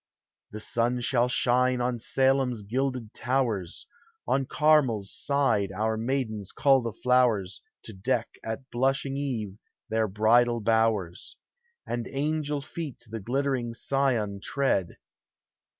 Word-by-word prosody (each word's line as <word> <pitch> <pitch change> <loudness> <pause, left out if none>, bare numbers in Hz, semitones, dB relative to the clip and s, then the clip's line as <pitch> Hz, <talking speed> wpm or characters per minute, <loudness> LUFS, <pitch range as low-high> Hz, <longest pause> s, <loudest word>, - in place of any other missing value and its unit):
The 110 - -7
sun 120 +3 0
shall 120 0 +2
shine 125 0 +2
on 120 -1 -1
Salem's 130 -2 +1
gilded 125 +1 -2
towers, 120 -9 -1 0.4
On 135 -1 +1
CarmeFs 135 -11 +3
side 135 -9 0
our 110 +3 -1
maidens 110 -4 -2
cull 135 -2 +4
the 115 -1 -3
flowers 115 -6 +1 0.2
To 110 - -9
deck 95 -1 -1 0.2
at 115 +4 -6
blushing 135 +2 0
eve 115 -8 -3 0.3
their 110 0 +2
bridal 115 +4 +3
bowers, 110 -5 0 0.5
And 120 -1 -3
angel 150 0 -2
feet 155 -2 -7
the 115 - -4
glittering 125 +1 -1
Sion 120 -8 0
tread. 130 -11 0
120 Hz, 120 wpm, -27 LUFS, 110-135 Hz, 0.5 s, cull